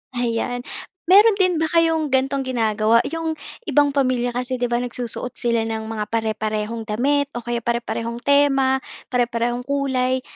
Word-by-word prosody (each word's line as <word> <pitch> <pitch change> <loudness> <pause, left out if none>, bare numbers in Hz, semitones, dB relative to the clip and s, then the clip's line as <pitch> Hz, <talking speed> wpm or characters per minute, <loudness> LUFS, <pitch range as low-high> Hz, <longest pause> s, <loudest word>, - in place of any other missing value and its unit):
Ayan. 245 +1 -2 0.4
Meron 410 +2 +7
din 365 -2 +3
ba - - +3
kayong 325 -2 +2
ganitong 270 +1 +1
ginagawa? 225 -2 +2
'Yong 325 0 -2 0.3
ibang 290 -1 +3
pamilya 255 -3 +1
kasi 250 +1 -2
'di 245 - 0
ba, 240 - +1
nagsusuot 245 0 -4
sila 235 -2 0
ng 220 -1 -3
mga 215 -2 -3
pare-parehong 220 0 -2
damit 275 +6 +1
o 240 - -4
kaya 240 0 -2
pare-parehong 235 0 -2
tema, 275 -1 +3 0.3
pare-parehong 240 0 -1
kulay. 260 -2 0
245 Hz, 145 wpm, -21 LUFS, 230-280 Hz, 0.4 s, Meron